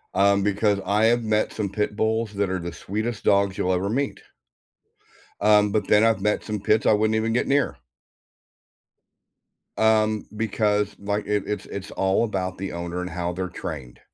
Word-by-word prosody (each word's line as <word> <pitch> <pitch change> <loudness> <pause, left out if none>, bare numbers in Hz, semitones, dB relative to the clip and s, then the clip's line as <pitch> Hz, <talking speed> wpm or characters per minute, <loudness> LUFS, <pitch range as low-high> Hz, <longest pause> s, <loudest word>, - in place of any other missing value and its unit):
Um, 100 +1 +4
because 105 0 +1
I 105 +3 +3
have 120 +1 +3
met 110 -1 0
some 105 -3 -2
Pit 105 +1 -2
Bulls 110 0 0
that 100 -1 -1
are 95 - -1
the 85 0 -6
sweetest 110 +3 -4
dogs 100 -1 +2
you'll 90 - +1
ever 95 +2 -1
meet. 140 +4 -2 1.2
Um, 105 0 +4
but 105 - 0
then 105 0 +5
I've 115 -4 +3
met 105 +1 0
some 105 -1 -4
Pits 105 +2 +1
I - - +5
wouldn't 110 +1 +2
even 110 +1 0
get 120 - 0
near. 140 - +1 2.0
Um, 110 -1 +2
because, 105 -1 0
like, 100 +1 -2
it 105 -1 0
it's 105 -2 -4
it's 100 0 -7
all 95 +3 +1
about 95 -3 -3
the 95 0 -5
owner 85 +1 -4
and 90 - -4
how 85 +1 -3
they're 90 +1 -3
trained, 75 -8 -7
105 Hz, 180 wpm, -24 LUFS, 95-110 Hz, 2.0 s, then